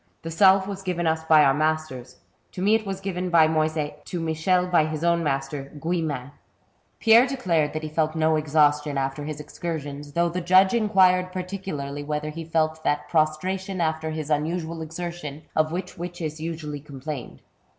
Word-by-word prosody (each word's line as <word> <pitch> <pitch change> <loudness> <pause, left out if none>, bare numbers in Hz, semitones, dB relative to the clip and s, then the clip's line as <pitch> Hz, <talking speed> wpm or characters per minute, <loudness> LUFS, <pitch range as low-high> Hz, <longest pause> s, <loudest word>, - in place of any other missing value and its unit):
The 165 - -5
salve 190 +3 +5
was 195 -1 -5
given 180 -2 -2
us 160 0 +1
by 155 -1 +6
our 135 -1 +5
masters; 155 -4 -2 0.4
to 180 - -6
me 205 +2 +4
it 220 -2 +1
was 195 -1 -3
given 185 -2 -3
by 165 -2 +6
Moyset, 155 -1 -1
to 175 - -4
Michel 165 +3 +1
by 175 -4 +3
his 155 0 -4
own 170 0 +2
master, 135 -1 -3
Guillemin." 155 -5 -2 0.7
Pierre 230 +3 +6
declared 170 - 0
that 155 0 -4
he - - -3
felt 155 0 0
no 160 0 +2
exhaustion 150 -1 +2
after 135 +2 -2
his 150 -1 -5
excursions, 145 -2 -6
though 170 +2 +2
the 180 +2 -3
judge 185 +3 +5
inquired 190 -5 +3
particularly 180 -7 -5
whether 150 +1 -3
he 165 +2 -6
felt 160 -1 0
that 145 0 -1
prostration 185 +5 0
after 160 -1 -1
his 155 -1 -4
unuBual 160 +2 -1
exertion, 160 -2 -6
of 155 0 +2
which 180 0 -5
witches 170 -3 -5
usually 155 -3 -5
complained. 140 -1 -8
160 Hz, 170 wpm, -25 LUFS, 150-180 Hz, 0.7 s, by